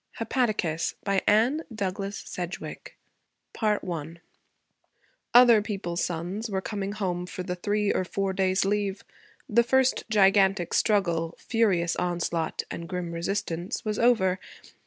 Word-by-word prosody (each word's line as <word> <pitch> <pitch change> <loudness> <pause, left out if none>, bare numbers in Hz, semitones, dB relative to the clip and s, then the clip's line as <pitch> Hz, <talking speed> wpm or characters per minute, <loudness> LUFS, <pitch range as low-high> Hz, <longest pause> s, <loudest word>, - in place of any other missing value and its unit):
HEPATICAS 215 -9 -1
BY 195 -1 +1
ANNE 235 +9 +4
DOUGLAS 200 -1 -3
SEDGWICK 180 +3 -7 0.6
I 175 -7 -1 1.2
Other 240 -3 +8
people's 195 -5 -3
sons 180 +7 -3
were 195 -2 -1
coming 200 0 -4
home 180 -4 -2
for 185 - -6
the 180 - -3
three 205 +3 0
or - - 0
four 195 +1 -2
days' 190 0 +1
leave. 200 -1 -1 0.4
The 235 +2 +4
first 265 +2 +2
gigantic 195 -3 +3
struggle 170 -6 +1
furious 190 -7 +1
onslaught 170 -2 -1
and 170 0 -6
grim 180 -2 -3
resistance 170 +1 -3
was 210 -1 -1
over. 195 -6 +3
195 Hz, 120 wpm, -27 LUFS, 175-210 Hz, 1.2 s, Other